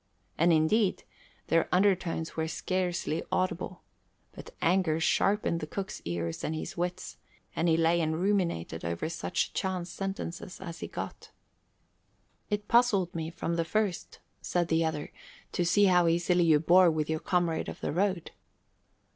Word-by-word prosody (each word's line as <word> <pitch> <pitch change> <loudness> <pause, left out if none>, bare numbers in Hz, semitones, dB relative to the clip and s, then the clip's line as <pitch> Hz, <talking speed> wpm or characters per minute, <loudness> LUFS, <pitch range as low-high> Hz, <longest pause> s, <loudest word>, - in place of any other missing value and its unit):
And 170 +2 +3
indeed, 185 +6 +2 0.5
their 165 0 +2
undertones 180 -4 +1
were 160 0 -1
scarcely 175 -1 -2
audible; 185 0 -2 0.5
but - - -11
anger 170 -2 +2
sharpened 195 0 +2
the 155 - -5
cook's 195 +5 -5
ears 85 -1 -3
and 160 - -2
his 155 - -5
wits, 175 +1 -4 0.4
and 165 - +1
he 160 - +4
lay 165 +1 +3
and 160 0 -1
ruminated 175 - 0
over 85 - -2
such 170 +2 -2
chance 185 -2 -2
sentences 190 -2 -5
as 170 -3 -7
he - - -5
got. - - -7 1.2
"It 210 0 -2
puzzled 220 -7 +3
me 160 -1 -3
from 170 0 -3
the 165 - +2
first," 205 0 -1 0.2
said 175 -2 -1
the 165 0 +2
other, 160 -2 -3 0.4
"to 175 - 0
see 180 +4 +3
how 180 -2 +4
easily 175 +1 +2
you 155 -2 +5
bore 175 +3 +6
with 155 -2 -1
your 160 0 -1
comrade 175 -2 0
of - - -8
the - - -2
road." 185 0 0
170 Hz, 155 wpm, -29 LUFS, 160-185 Hz, 1.2 s, bore